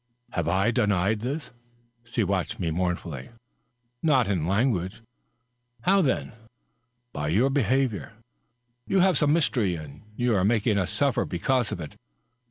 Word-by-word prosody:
"Have 85 -3 -2
I 95 +6 +2
denied 105 -3 +1
this?" 135 +6 -4 0.5
She 115 -1 -1
watched 95 -2 -1
me 85 -3 -1
mournfully. 85 -5 -3 0.4
" - - -49 0.3
Not 135 -8 +3
in 90 -6 0
language." 100 -1 0 0.8
"How, 195 +2 +4
then?" 140 -7 0 0.4
" 125 +1 -49
By 75 0 -3
your 110 - +2
behavior. 130 -4 0 0.7
You 190 - +3
have 185 -5 +3
some 145 -1 +3
mystery, 120 - +2
and 75 -1 -9
you 120 0 +1
are 95 - +2
making 105 0 +2
us 95 -2 -1
suffer 140 +2 +1
because 120 +6 0
of - - -4
it." 75 -3 -8
110 Hz, 150 wpm, -26 LUFS, 90-130 Hz, 0.8 s, How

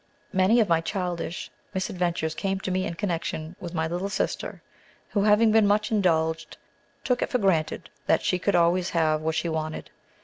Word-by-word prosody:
Many 190 +5 +4
of 220 - +3
my 165 -2 +3
childish 175 -1 -3 0.2
misadventures 175 -4 -1
came 195 -1 -2
to 190 - -3
me 185 0 0
in 170 - -5
connection 165 -3 -3
with 175 -1 -7
my 160 -1 0
little 175 +4 -2
sister, - - -3 0.5
who, 205 - 0
having 215 +2 +5
been 220 -1 +5
much 210 +2 +2
indulged, 165 -5 +1 0.5
too 250 - +2
it - - 0
for 250 - +1
granted 190 -8 0 0.2
that 160 - +3
she 180 - +1
could 200 +2 +1
always 175 +1 +3
have 155 -2 +1
what 160 0 -1
she 170 - 0
wanted. 155 -1 -4
180 Hz, 180 wpm, -26 LUFS, 160-200 Hz, 0.5 s, having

